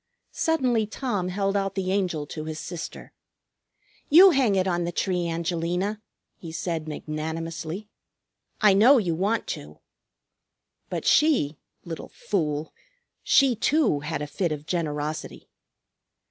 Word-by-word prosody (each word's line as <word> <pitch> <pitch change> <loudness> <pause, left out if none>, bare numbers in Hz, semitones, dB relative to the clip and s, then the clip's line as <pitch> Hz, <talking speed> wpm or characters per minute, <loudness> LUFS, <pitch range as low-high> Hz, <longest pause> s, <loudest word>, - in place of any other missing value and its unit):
Suddenly 250 -9 +1
Tom 210 -5 -2
held 195 +2 -1
out 195 -1 -1
the 190 -1 -1
Angel 180 -6 0
to 155 +1 -7
his 155 0 -5
sister. 170 +1 -7 1.0
"You 365 +6 +9
hang 260 -9 +3
it 190 0 +1
on 175 -1 0
the 170 - -2
tree, 180 -1 -1
Angelina," 175 +5 -2 0.3
he 165 - -9
said 165 -1 -3
magnanimously. 160 +4 -5 0.7
"I 210 -3 +6
know 235 +8 +7
you 180 -8 +1
want 200 +7 0
to." - - -6 1.1
But - - -4
she 250 - +3 0.3
little 165 -2 -7
fool! 155 -5 -2 0.5
she 270 -3 +4
too 255 - +2
had 150 0 -3
a - - -2
fit 170 +4 -1
of 150 -1 -5
generosity. 155 -3 -3
180 Hz, 130 wpm, -25 LUFS, 160-210 Hz, 1.1 s, You